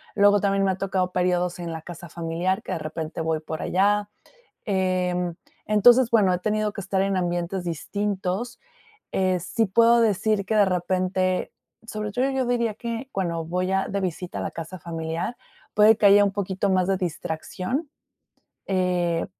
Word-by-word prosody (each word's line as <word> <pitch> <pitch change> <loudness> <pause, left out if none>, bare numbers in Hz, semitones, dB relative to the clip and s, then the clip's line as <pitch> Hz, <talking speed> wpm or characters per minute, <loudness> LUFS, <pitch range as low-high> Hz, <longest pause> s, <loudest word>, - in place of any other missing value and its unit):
luego 205 0 +5
también 195 -1 +2
me 190 - +3
ha 185 - -3
tocado 190 -2 -1
periodos 180 -1 0
en 170 -1 -4
la 160 - -6
casa 175 -1 -9
familiar, 175 +5 -2
que - - -6
de - - -3
repente 155 +1 -5
voy 160 -1 0
por 160 0 -5
allá. 205 +2 +1 0.6
Em, 180 -3 0 0.3
entonces, 235 +4 +5
bueno, 205 -5 +4
he - - -1
tenido 215 +2 -1
que 200 - -6
estar 190 +1 0
en 195 -1 0
ambientes 175 +1 -2
distintos, 195 +5 -3 0.5
eh, 185 -1 +1
sí 220 +5 0
puedo 230 +4 +5
decir 210 -2 +1
que 215 +2 0
de 205 - +6
repente 185 0 0 0.4
sobre 210 -2 -4
todo, 260 +4 +1
yo 265 -1 0
diría 235 -2 +1
que 235 +3 -5
cuando 170 -4 -2
voy 180 +3 -2
a 195 0 +1
de 200 0 -2
visita 180 -1 -4
a - - -3
la - - -3
casa 165 +3 -7
familiar, 165 +5 -4 0.4
puede 215 +1 +6
que 205 - +4
haya 205 +1 +7
un 200 - 0
poquito 195 0 -1
más 185 0 +2
de 195 - +2
distracción, 180 - -3 0.8
eh, 180 -3 +1
190 Hz, 175 wpm, -24 LUFS, 175-205 Hz, 0.8 s, haya